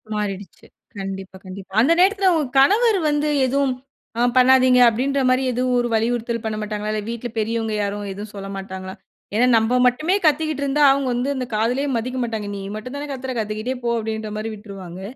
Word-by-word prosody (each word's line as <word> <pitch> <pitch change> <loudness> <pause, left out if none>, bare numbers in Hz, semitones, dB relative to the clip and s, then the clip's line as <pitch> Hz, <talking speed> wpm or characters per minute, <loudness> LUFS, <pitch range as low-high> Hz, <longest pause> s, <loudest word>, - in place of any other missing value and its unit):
மாறிடுச்சு. 200 -2 -5 0.3
கண்டிப்பா, 195 -1 -6
கண்டிப்பா. 190 +1 -10
அந்த 290 +8 +4
நேரத்துல 385 +1 +4
உங்க 310 -2 +1
கணவர் 425 - +4
வந்து 295 0 0 0.2
எதுவும் 270 0 +1 0.5
அ - - +2 0.2
பண்ணாதீங்க 255 0 +6
அப்பிடீன்றமாரி 255 +2 +1
எதுவும் 245 -1 0
வலியுறுத்தல் 230 0 -1
பண்ண 220 -1 -2
மாட்டாங்களா? 210 0 -3
இல்ல 215 - -2
வீட்ல 235 +1 -5
பெரியவங்க 225 0 -1
யாரும் 205 0 -3
எதுவும் 205 +2 -8
சொல்லமாட்டாங்களா? 195 -1 -7 0.4
ஏன்னா, 245 +3 +4
நம்ப 225 +2 +1
மட்டுமே 305 +10 +1
கத்திக்கிட்டு 305 -1 +1
இருந்தா, 285 +2 +2
அவுங்க 275 0 0
வந்து 245 +3 -1
அந்த 255 -1 -3
காதிலே 240 +6 0
மதிக்க 255 +3 -3
மாட்டாங்க. 220 -3 -4
நீ 200 - -6
மட்டும் 250 +5 -7
தானே 290 +1 -5
கத்துற 265 -1 -5
கத்திக்கிட்டே 215 +4 -3
போ! 235 - 0
அப்பிடின்றமாரி 220 0 -4
விட்டுருவாங்க. 195 -4 -9
235 Hz, 160 wpm, -21 LUFS, 210-265 Hz, 0.5 s, பண்ணாதீங்க